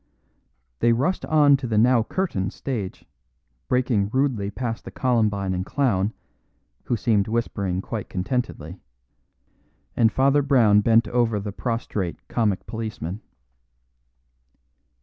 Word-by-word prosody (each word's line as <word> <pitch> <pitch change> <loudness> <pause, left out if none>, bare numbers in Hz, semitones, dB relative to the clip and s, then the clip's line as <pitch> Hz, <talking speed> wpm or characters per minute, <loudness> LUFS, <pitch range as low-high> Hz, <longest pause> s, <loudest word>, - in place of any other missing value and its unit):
They 120 - +4
rushed 140 +11 0
on 145 -3 +5
to 130 -2 -5
the 110 -2 0
now 120 +2 +5
curtained 110 - -2
stage, 110 -9 -5 0.6
breaking 125 -6 +1
rudely 125 -5 0
past 115 +2 -4
the - - -8
columbine 105 -6 0
and 90 0 -2
clown 105 -5 0 0.7
(who 120 - 0
seemed 105 -2 +1
whispering 100 -5 -2
quite 110 -4 -5
contentedly), 95 - -3 1.2
and 110 -2 +4
Father 140 +3 +3
Brown 120 -7 +4
bent 115 +1 +4
over 115 -2 +1
the 100 +1 -5
prostrate 105 -5 -4
comic 105 -5 0
policeman. 110 -4 -5
115 Hz, 115 wpm, -24 LUFS, 100-125 Hz, 1.2 s, on